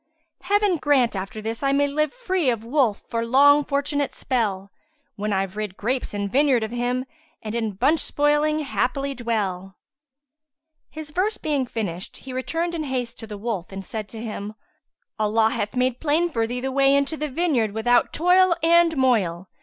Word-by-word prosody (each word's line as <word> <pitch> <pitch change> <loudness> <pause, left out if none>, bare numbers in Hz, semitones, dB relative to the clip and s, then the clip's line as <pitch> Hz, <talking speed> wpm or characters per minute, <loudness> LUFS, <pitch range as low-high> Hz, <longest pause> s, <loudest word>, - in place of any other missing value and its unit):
Heaven 405 -1 +2
grant 275 -7 +2
after 195 +3 -5
this 225 +1 -4
I 275 -1 +1
may 285 +1 +3
live 305 +2 0
* - - -22
Free 365 -7 +1
of 230 -3 -1
Wolf 240 -3 +1
for 230 0 -2
long 285 +5 +5
fortunate 285 0 -1
spell 200 -7 -2 0.4
When 210 +1 -3
I've 195 -1 -1
rid 210 -3 -4
grapes 250 +4 -2
and 200 0 -1
vineyard 260 0 +3
of 220 - -4
him, 245 +1 -1 0.2
* 320 0 -35
And 215 -1 -5
in 225 -3 -2
bunch 275 +11 +2
spoiling 295 +1 +1
happily 275 0 -1
dwell." 200 -6 -3 1.1
His 310 -1 -9
verse 385 +7 0
being 285 -4 -1
finished 195 -5 -5
he 265 - -9
returned 330 +7 -2
in 320 -2 -3
haste 250 -3 -3
to 225 - -8
the 210 -1 -7
wolf 200 -4 -4
and 195 0 -7
said 215 0 -5
to 225 - -8
him, 210 -1 -6 0.6
"Allah 220 +1 +2
hath 205 +3 -3
made 250 0 +1
plain 320 +3 +1
for 230 -5 0
thee 245 +1 -4
the 265 +1 -2
way 275 +1 +4
into 280 +3 +1
the 300 -1 -3
vineyard 265 -8 +1
without 240 +3 +2
toil 360 +1 +4
and 335 -1 +4
moil. 195 -9 +1
255 Hz, 185 wpm, -23 LUFS, 220-295 Hz, 1.1 s, long